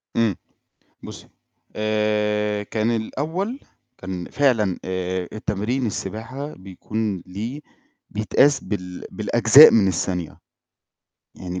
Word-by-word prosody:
إمم 115 -5 +2 0.7
بُصّي، - - -10 0.5
آآ 105 -1 0
كان 110 +2 -1
الأول 160 - -2 0.4
كان 95 -2 -6
فعلًا 115 -10 +2
آآ 95 -1 -3
التمرين 110 +4 -2
السباحة 115 +8 -5
بيكون 100 +1 -4
ليه 110 +10 -5 0.5
بيتقاس 130 +6 +3
بال 90 -3 -5
بالأجزاء 115 +6 +7
من 105 -4 +4
الثانية، 90 -1 -2 1.0
يعني 90 0 -6
105 Hz, 95 wpm, -22 LUFS, 95-115 Hz, 1.0 s, بالأجزاء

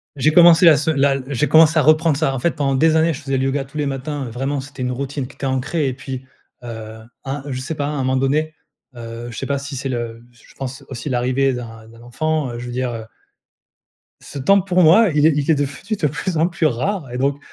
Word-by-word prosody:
J'ai 145 +3 +2
commencé 170 +1 +7
la 160 -3 +8
se 150 +2 -1
la 140 -2 +2
j'ai 140 +1 0
commencé 160 0 +5
à 155 - +5
reprendre 155 -1 +4
ça. 145 -3 0
En 135 - -3
fait, 170 - +1
pendant 140 -3 -1
des 160 +4 +3
années, 160 +1 +3
je 145 - -8
faisais 135 -2 -2
le 130 - 0
yoga 135 0 -1
tous 135 +3 -11
les 150 - 0
matins, 140 +1 -4
vraiment, 135 +3 -2
c'était 135 -1 -10
une 125 - -1
routine 135 +1 -4
qui - - -16
était - - -5
ancrée 135 +3 -1
et 130 - -4
puis, 130 -1 -7 0.4
heu, 110 -2 -8 0.2
un, 135 0 -4
je 130 - -3
sais 145 +5 -5
pas, 145 - -2
à - - -2
un 150 - -3
moment 130 0 0
donné, 150 +4 0 0.4
heu, 115 0 -7
je 110 - -9
sais - - -4
pas 140 -1 -1
si 140 0 -7
c'est 135 +1 -4
le 120 -2 -4
je 120 - -21
pense 135 0 -6
aussi 130 +3 -6
l'arrivée 130 +2 +1
d'un 115 -2 -8
d'un 115 0 -16
enfant, 150 +4 -2
heu, 120 - -6
je 120 - -7
veux 120 - -6
dire, 125 0 -2
heu. 110 -1 -6 1.2
Ce 140 - -9
temps 195 +9 +4
pour 185 -1 +1
moi, 185 +7 +6
il 150 +1 +4
est 160 - +3
il 145 0 -1
est - - +4
devenu 145 +9 -3
de 165 -7 0
plus 160 +4 -3
en 160 - +3
plus 175 -2 -2
rare 150 - -1
et 125 - -4
donc, 140 +1 +1
140 Hz, 255 wpm, -20 LUFS, 130-155 Hz, 1.2 s, la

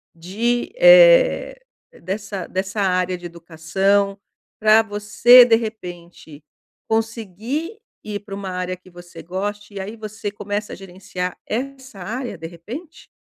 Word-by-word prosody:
de, 220 +9 -2
eh, - - +6 0.4
dessa 195 0 -5
dessa 190 +2 -3
área 185 -1 0
de 175 - -12
educação, 175 +4 -1 0.4
pra 215 +1 +6
você, 220 +4 +6
de 230 -2 +5
repente, 175 -8 -8 0.4
conseguir 225 - -3 0.2
ir 210 -1 -5
pra 205 -1 -8
uma 195 -1 -6
área 185 0 -3
que 185 +1 -19
você 175 0 -12
goste 205 +3 -5
e - - -5
aí 200 +4 -6
você 215 -1 -6
começa 205 +1 -5
a - - -6
gerenciar 180 -1 -6
essa 260 -2 -5
área, 240 +4 -5
de 165 - -7
repente? 230 - -10
205 Hz, 130 wpm, -21 LUFS, 180-225 Hz, 0.4 s, eh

